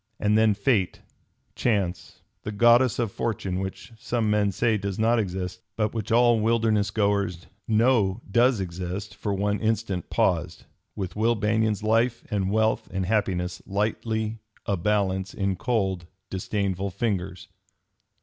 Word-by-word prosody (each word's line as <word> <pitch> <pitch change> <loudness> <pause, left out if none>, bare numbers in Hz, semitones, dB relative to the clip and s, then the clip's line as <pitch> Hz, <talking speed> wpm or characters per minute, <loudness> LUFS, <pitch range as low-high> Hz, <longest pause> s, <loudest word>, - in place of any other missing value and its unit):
And 105 0 +2
then 110 -1 +4
fate, 100 -3 +1 0.5
chance, 95 -7 -1 0.2
the 105 - -5
goddess 120 +3 +4
of 115 -4 -1
fortune 95 -5 -2
which 95 +5 -6
some 115 -3 0
men 105 -1 +2
say 115 +3 +1
does 100 -2 -3
not 115 +2 +3
exist, 90 -2 -3
but 105 -1 0
which 110 -3 -4
all 120 0 +5
wilderness 110 -2 +2
goers 100 -4 0 0.2
know 110 -3 +3
does 120 +1 +4
exist, 90 +3 -5
for 105 - -4
one 100 +1 0
instant 110 -5 -1
paused, - - 0 0.3
with 95 -3 -4
Will 115 +3 +2
Banion's 110 0 0
life 115 +2 +1
and 100 -2 0
wealth 110 +2 +1
and 95 0 -2
happiness 95 -3 -1
lightly 110 +2 -1 0.3
a 100 - +1
balance 95 0 0
in 100 -1 0
cold, 95 -5 -1 0.2
disdainful 95 0 -2
fingers. 95 -4 -3
105 Hz, 140 wpm, -25 LUFS, 95-110 Hz, 0.5 s, all